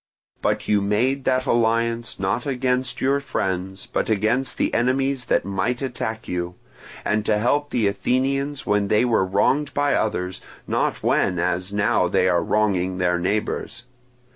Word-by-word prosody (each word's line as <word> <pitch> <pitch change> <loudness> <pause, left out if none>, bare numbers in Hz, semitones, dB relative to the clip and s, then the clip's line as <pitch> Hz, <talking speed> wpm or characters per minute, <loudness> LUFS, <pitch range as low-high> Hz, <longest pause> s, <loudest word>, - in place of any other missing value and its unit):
But - - -1
you 105 -1 +3
made 125 +7 0
that 130 0 +1
alliance, 115 -1 +1
not 100 +7 -1
against 125 -1 -1
your 140 +2 +2
friends, 95 -7 -3
but - - -2
against 110 +5 +1
the - - 0
enemies 130 +2 +1
that - - +1
might 100 +6 -1
attack 110 -3 -4
you, 90 0 -3 0.5
and 105 0 +1
to 105 - +3
help 145 +7 +1
the 115 -4 0
Athenians 135 +8 0
when 105 -1 +1
they 105 +4 +3
were 115 -5 +2
wronged 140 +10 +1
by 145 -1 +2
others, 90 -4 -1 0.2
not - - -1
when 90 -2 +2
as 90 +2 -1
now 100 0 +2
they 90 - +2
are 85 -2 +2
wronging 95 -3 +1
their 90 -1 +1
neighbours. 105 +6 -2
110 Hz, 155 wpm, -23 LUFS, 95-130 Hz, 0.5 s, you